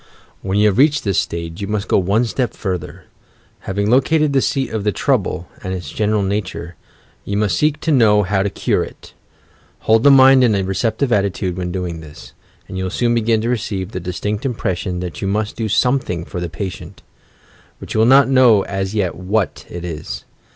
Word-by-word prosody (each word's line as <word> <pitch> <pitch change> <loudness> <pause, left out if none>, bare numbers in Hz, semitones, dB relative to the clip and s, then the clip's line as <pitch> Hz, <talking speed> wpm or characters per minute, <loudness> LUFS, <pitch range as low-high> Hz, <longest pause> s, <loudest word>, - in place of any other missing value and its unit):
"When 95 +1 -2
you 105 - +4
have 105 +2 +2
reached 150 +1 +4
this 100 -4 +1
stage, 85 +1 -4
you 100 - -3
must 105 -1 -2
go - - +3
one 100 +6 +1
step 120 +1 -2
further. 90 -6 -5 0.7
Having 100 +2 0
located 150 +3 +3
the 135 - +3
seat 135 0 -1
of 110 -2 -3
the 105 - +1
trouble, 85 -1 -1
and 95 0 -4
its 85 -6 -7
general 105 -1 0
nature, 95 -3 -3 0.5
you 100 - -3
must 105 -4 +1
seek 150 0 +1
to 160 - 0
know 110 -6 +4
how 95 +1 0
to 100 - 0
cure - - 0
it. - - -12 0.7
Hold 110 0 +3
the 140 - +6
mind 135 -1 +7
in 115 -4 +3
a 100 - 0
receptive 110 +7 -1
attitude, 100 -2 0
when 90 -1 -4
doing 90 -3 -4
this, 75 -2 -13 0.3
and 95 - -6
you 95 - -2
will - - -2
soon 120 +5 0
begin 115 -1 +1
to 115 - -2
receive 100 -5 -3
the 90 - -4
distinct 95 +4 -4
impression 95 -8 -2
that 90 -4 -6
you 95 - -1
must 105 +1 -1
do 110 -2 -3
something 110 -7 0
for 90 - -6
the 85 -1 -4
patient 90 +3 -7 0.4
— - - -31
but - - -8
you - - 0
will 110 - +5
not 135 +2 +6
know 125 -6 +5
as 95 +1 -3
yet 95 -5 0
u^hat 95 +3 -2
it 85 0 -7
is. 80 -2 -6
100 Hz, 205 wpm, -18 LUFS, 90-115 Hz, 0.7 s, mind